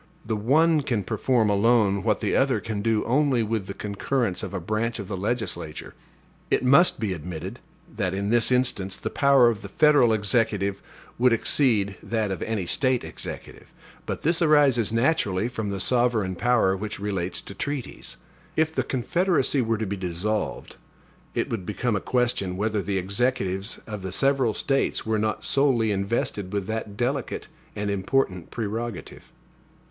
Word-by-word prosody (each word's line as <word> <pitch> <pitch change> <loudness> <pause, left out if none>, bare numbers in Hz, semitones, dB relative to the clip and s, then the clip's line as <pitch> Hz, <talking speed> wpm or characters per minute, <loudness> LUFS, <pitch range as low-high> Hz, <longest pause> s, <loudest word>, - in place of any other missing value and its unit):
The 110 - -1
one 150 +9 +3
can 120 -7 -1
perform 110 +1 +1
alone 100 -1 +3
what 105 0 0
the - - 0
other 135 -1 +2
can 110 -3 -4
do 110 0 +1
only 130 -1 +2
with 110 -3 -2
the 100 - -6
concurrence 105 +1 -2
of - - -5
a 95 - -3
branch 110 +6 -2
of 100 -4 -6
the 100 - -4
legislature. 100 -6 -3 0.6
It - - +1
must 140 +6 +5
be 105 -4 -1
admitted, 80 -1 -6 0.4
that, 95 +1 -1
in 100 +2 -2
this 120 +1 +3
instance, 120 -7 +1
the - - -5
power 140 -3 +5
of 115 -4 0
the - - -8
federal 145 -6 +4
Executive 105 -2 +1 0.4
would 125 +1 +5
exceed 110 -5 +2
that 110 -3 -1
of 95 - -4
any 110 -5 -2
State 130 +6 +2
Executive. - - -8 0.4
But - - -4
this 165 +2 +2
arises 145 -9 +4
naturally 115 - +1
from 110 -4 -4
the 100 -1 -3
sovereign 120 -3 +1
power 110 -3 +2
which 105 +2 -5
relates 95 -3 -2
to - - -9
treaties. 140 +3 -4 0.4
If 160 0 +1
the - - +1
Confederacy 145 +1 +1
were 115 -1 0
to 110 - -2
be 100 0 -3
dissolved, 95 +4 -3 0.6
it - - 0
would 110 -5 -2
become 105 +4 -1
a 95 - -1
question, 120 -7 0
whether 105 0 0
the 100 0 -2
Executives 100 0 -1
of 105 -2 -6
the 95 0 -5
several 135 0 +2
States 135 -1 0
were 110 -1 0
not 110 +1 -2
solely 130 -6 +2
invested 100 -1 -2
with 100 -2 -2
that 110 -1 -4
delicate 130 +2 -2 0.3
and 105 0 -2
important 95 -2 -1
prerogative. 115 -2 -5
110 Hz, 165 wpm, -25 LUFS, 100-125 Hz, 0.6 s, must